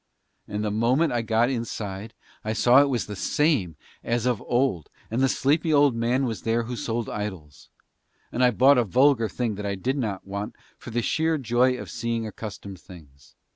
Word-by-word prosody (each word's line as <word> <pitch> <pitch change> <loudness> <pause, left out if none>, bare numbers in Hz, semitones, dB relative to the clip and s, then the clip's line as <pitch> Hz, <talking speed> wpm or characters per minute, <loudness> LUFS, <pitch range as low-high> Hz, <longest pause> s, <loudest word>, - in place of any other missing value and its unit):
And 105 +1 -3
the 105 - -1
moment 125 +9 +2
I 120 - +1
got 115 +2 +1
inside 110 -3 -5 0.3
I 110 - -2
saw 125 +4 +6
it 145 - +2
was 125 -4 0
just - - -6
the 105 - -5
same 125 - +1 0.3
as 120 0 -1
of 125 -4 0
old, 120 - 0 0.2
and 120 +3 0
the 135 - +3
sleepy 155 +6 +1
old 145 -4 +4
man 120 +3 +1
was 115 -4 -3
there 115 +1 0
who 120 +2 -5
sold 115 -1 -3
idols. 95 -9 -6 0.6
And 125 - 0
I 125 - +6
bought 130 +3 +5
a - - +3
vulgar 125 +1 +3
thing 115 +2 -2
that 105 - -5
I 100 - -1
did 130 +9 -2
not 105 -6 -3
want, 100 +2 -5 0.2
for - - -11
the 120 0 -1
sheer 160 +3 +1
joy 125 0 +2
of - - -8
seeing 115 -1 -2
accustomed 100 -3 -8
things. 75 -8 -16
115 Hz, 200 wpm, -25 LUFS, 105-130 Hz, 0.6 s, saw